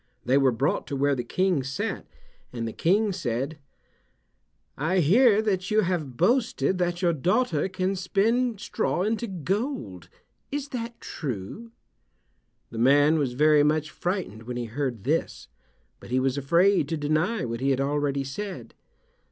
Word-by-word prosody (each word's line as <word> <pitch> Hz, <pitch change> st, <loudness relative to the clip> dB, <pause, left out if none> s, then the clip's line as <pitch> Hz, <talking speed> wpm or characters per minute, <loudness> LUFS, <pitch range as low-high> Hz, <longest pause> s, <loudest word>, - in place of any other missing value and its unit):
They 125 Hz, +3 st, +3 dB
were 135 Hz, -2 st, +4 dB
brought 130 Hz, +5 st, -1 dB
to 140 Hz, -, -3 dB
where 140 Hz, +1 st, +2 dB
the 125 Hz, -3 st, -2 dB
King 185 Hz, +4 st, +1 dB
sat, 135 Hz, +1 st, -4 dB, 0.4 s
and 115 Hz, -2 st, -4 dB
the 115 Hz, -, -5 dB
King 205 Hz, +5 st, +2 dB
said, 145 Hz, -3 st, -3 dB, 1.2 s
"I 160 Hz, +7 st, 0 dB
hear 210 Hz, -, +5 dB
that 190 Hz, -3 st, -1 dB
you 215 Hz, 0 st, +3 dB
have 165 Hz, -, -2 dB
boasted 190 Hz, -, +1 dB
that 175 Hz, +1 st, -1 dB
your 170 Hz, -1 st, +3 dB
daughter 180 Hz, -, +1 dB
can 185 Hz, +1 st, -1 dB
spin 220 Hz, +6 st, +1 dB
straw 180 Hz, -1 st, -1 dB
into 225 Hz, +3 st, -1 dB
gold. 185 Hz, -, -3 dB, 0.4 s
Is 290 Hz, 0 st, -3 dB
that 235 Hz, -2 st, -5 dB
true?" 135 Hz, -, -6 dB, 1.0 s
The 115 Hz, -, -6 dB
man 145 Hz, +5 st, +5 dB
was 135 Hz, -4 st, -1 dB
very 150 Hz, +3 st, +4 dB
much 155 Hz, +1 st, +1 dB
frightened 175 Hz, -, -3 dB
when 125 Hz, -1 st, -4 dB
he 120 Hz, -, -3 dB
heard 120 Hz, -2 st, -3 dB
this, 155 Hz, +7 st, -2 dB, 0.5 s
but -, -, -13 dB
he 130 Hz, +1 st, +1 dB
was 130 Hz, 0 st, 0 dB
afraid 170 Hz, +3 st, +3 dB
to 165 Hz, -, -1 dB
deny 155 Hz, -, 0 dB
what 115 Hz, -1 st, -4 dB
he 135 Hz, +2 st, 0 dB
had 135 Hz, -1 st, +1 dB
already 140 Hz, 0 st, 0 dB
said. 190 Hz, +9 st, -6 dB
155 Hz, 155 wpm, -26 LUFS, 135-195 Hz, 1.2 s, hear